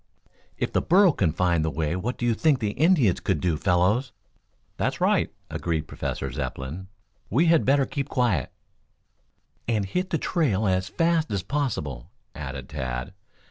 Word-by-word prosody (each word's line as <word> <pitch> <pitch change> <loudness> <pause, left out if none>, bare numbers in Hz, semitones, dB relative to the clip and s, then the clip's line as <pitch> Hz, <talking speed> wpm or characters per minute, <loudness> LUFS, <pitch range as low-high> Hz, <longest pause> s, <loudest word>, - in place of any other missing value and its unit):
"If - - -2
the - - +2
burro 185 +1 +5
can 95 - +1
find 85 -1 +1
the 80 - 0
way 80 +2 -1
what 115 +7 -3
do 120 - -2
you 120 - +3
think 135 0 +2
an 105 - +1
Indian 145 - +3
could 95 -6 -1
do, 85 -1 +1
fellows?" 95 - +2 0.7
"That's - - -1
right," - - +2 0.2
agreed 80 -2 -2
Professor - - -4
Zepplin. 75 +9 -5 0.4
"We 140 - +3
had 165 -1 +4
better 135 +1 +4
keep 140 +1 -4
quiet 115 - +1 0.6
" - - -44
"And 110 -4 +1
hit 180 - -2
the 170 - +1
trail 120 - 0
as 95 0 0
fast 165 +1 +1
as 100 -3 -2
possible," 80 - -3 0.2
added 70 -2 -6
Tad. 65 +5 -4
100 Hz, 165 wpm, -25 LUFS, -, 0.7 s, burro